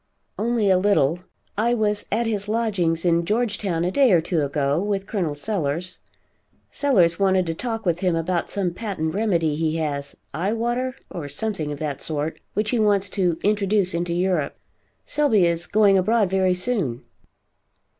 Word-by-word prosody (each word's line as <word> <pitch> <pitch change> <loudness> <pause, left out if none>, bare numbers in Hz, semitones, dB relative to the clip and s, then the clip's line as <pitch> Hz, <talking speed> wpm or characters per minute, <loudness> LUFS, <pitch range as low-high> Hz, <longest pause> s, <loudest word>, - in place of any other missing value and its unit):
"Only 220 -2 +1
a 185 - +4
little. 180 -5 +2 0.4
I 235 +3 +1
was 210 -2 0
at 230 +3 +1
his 210 -2 -2
lodgings' 195 -7 0
in 170 -1 +3
Georgetown 200 -4 -1
a 180 - 0
day 270 +1 +4
or 175 - +6
two 165 0 -1
ago, 140 +1 0
with 200 -1 -2
Col. 180 -9 -2
Sellers. 170 0 -2 0.7
Sellers 185 -12 +2
wanted 190 -2 +3
to 165 - -2
talk 225 +4 -4
with 175 -1 +1
him 180 -3 +1
about 170 +1 -1
some 190 -4 -1
patent 180 -7 -3
remedy 175 -7 +1
he 160 0 -1
has, 145 -3 -3 0.2
Eye 185 +8 -1
Water, 240 +2 -1 0.2
or 165 -5 -5
something 155 0 -3
of 145 - -5
that 145 -2 -4
sort, 155 0 -3 0.2
which 210 +1 0
he 245 - +1
wants 205 -2 +2
to 180 -5 0
introduce 205 -2 +1
into 170 0 -1
Europe. 175 -5 0 0.5
Selby 260 -11 +3
is 170 0 0
going 205 -2 +4
abroad 210 0 +2
very 190 -1 +2
soon." 180 - -1
185 Hz, 165 wpm, -23 LUFS, 165-215 Hz, 0.7 s, or